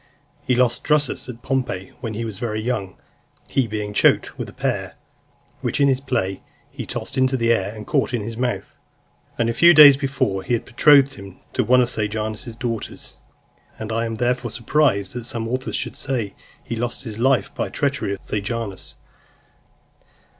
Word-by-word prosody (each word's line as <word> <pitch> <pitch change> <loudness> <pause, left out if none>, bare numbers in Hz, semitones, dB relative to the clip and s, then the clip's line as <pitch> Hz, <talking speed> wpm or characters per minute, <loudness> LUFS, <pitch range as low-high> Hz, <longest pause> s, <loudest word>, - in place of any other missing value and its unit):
He 125 -3 +1
lost 120 -1 +2
Drusus 150 -4 +1
at 120 0 -9
Pompeii, 125 -8 -2
when 115 -3 -5
he 115 +2 -3
was 105 -3 -6
very 110 -3 -2
young; 110 -5 -3 0.5
he 130 -3 +1
being 105 -1 -4
choked - - +3
with - - -5
a - - -10
pear, - - -2 0.6
which - - -1
in 140 - +5
his 135 -1 +2
play 95 -8 -2 0.3
he - - -7
tossed - - -3
into 130 0 +2
the 115 -1 +3
air, 100 -3 -1
and 105 -1 -8
caught 140 -3 +1
in 120 -4 -2
his 115 +2 -5
mouth. 125 +1 -3 0.6
Only 115 -1 +1
a - - -3
few 170 +8 +6
days 145 -3 +10
before, 130 -8 -1
he 110 - -2
had 120 - 0
betrothed 140 +2 +5
him 100 -1 -12
to 130 - +1
one 125 +3 +5
of 120 - +1
Sejanus's 110 +2 -3
daughters; 115 -2 -5 0.6
and 110 0 -6
I 115 +1 0
am 115 - -4
therefore 125 +1 0
surprised 115 -6 +1
that 120 -2 -4
some 115 -2 -1
authors 130 +2 -3
should - - -2
say 115 -7 -2 0.3
he 115 - -4
lost 120 +3 -3
his 110 -3 -6
life 130 +1 +2
by - - -2
the - - -7
treachery 140 -7 -1
of - - -8
Sejanus. 105 -1 -4
120 Hz, 185 wpm, -22 LUFS, 110-130 Hz, 0.6 s, days